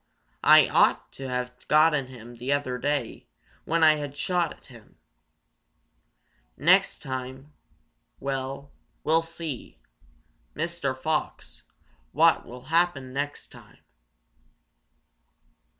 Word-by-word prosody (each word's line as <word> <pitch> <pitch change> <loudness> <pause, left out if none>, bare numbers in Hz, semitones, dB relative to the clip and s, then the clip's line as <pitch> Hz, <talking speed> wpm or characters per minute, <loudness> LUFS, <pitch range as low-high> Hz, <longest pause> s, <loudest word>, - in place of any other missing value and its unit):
"I - - +7
ought - - +2
to 135 -1 -7
have 125 0 -3
gotten 150 -3 +4
him 120 -2 -12
the 125 +4 -3
other 140 -3 -1
day 140 -2 -2 0.4
when 165 0 +1
I 155 -1 +6
had 145 -2 -5
a - - -21
shot 175 0 0
at - - -15
him. 120 -5 -17 1.6
Next 185 +7 +3
time 130 +1 -6 0.7
well, 135 +1 -4 0.3
we'll 160 +2 +3
see, 165 - -7 0.8
Mr. 155 -6 -2
Fox, 155 +3 -3 0.5
what - - +4
will 125 +1 -10
happen 165 -7 +1
next 145 +2 -4
time." - - -16
140 Hz, 105 wpm, -26 LUFS, 130-160 Hz, 1.6 s, I